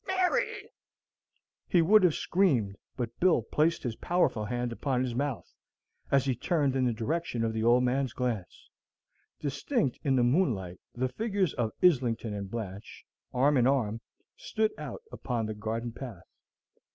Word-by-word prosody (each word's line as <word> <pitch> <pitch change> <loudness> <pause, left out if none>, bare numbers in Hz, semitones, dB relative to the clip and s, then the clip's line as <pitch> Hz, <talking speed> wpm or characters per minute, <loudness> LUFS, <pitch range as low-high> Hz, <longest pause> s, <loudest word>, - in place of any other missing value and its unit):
Mary!" 420 +3 0 1.0
He 175 -2 +4
would 210 +6 +6
have 175 -4 +4
screamed, 130 - +1 0.2
but 115 -2 -4
Bill 185 -1 +4
placed 160 +3 +1
his 120 -4 -2
powerful 175 -11 +1
hand 120 +2 -2
upon 130 +1 -1
his 125 -2 -2
mouth, 140 +1 -3 0.6
as 140 -1 +3
he 135 - +2
turned 140 +1 0
in 130 -1 +2
the 125 - +2
direction 120 +2 -2
of 110 -1 0
the 110 0 -1
old 120 +2 +5
man's 130 0 +1
glance. 115 -9 -4 0.7
Distinct 140 - -1
in 135 -2 +2
the 125 - +3
moonlight 120 - +1 0.2
the 130 +2 0
figures 200 - -1
of 115 -2 -1
Islington 120 -10 +3
and 100 -1 -5
Blanche, 100 -3 -7 0.3
arm 140 +3 +3
in 125 0 +4
arm, 115 -5 +1 0.3
stood 220 -1 -1
out 470 - -7
upon 120 -3 -2
the 110 - -3
garden 110 +3 -3
path. 115 -7 -8
125 Hz, 155 wpm, -29 LUFS, 115-165 Hz, 1.0 s, would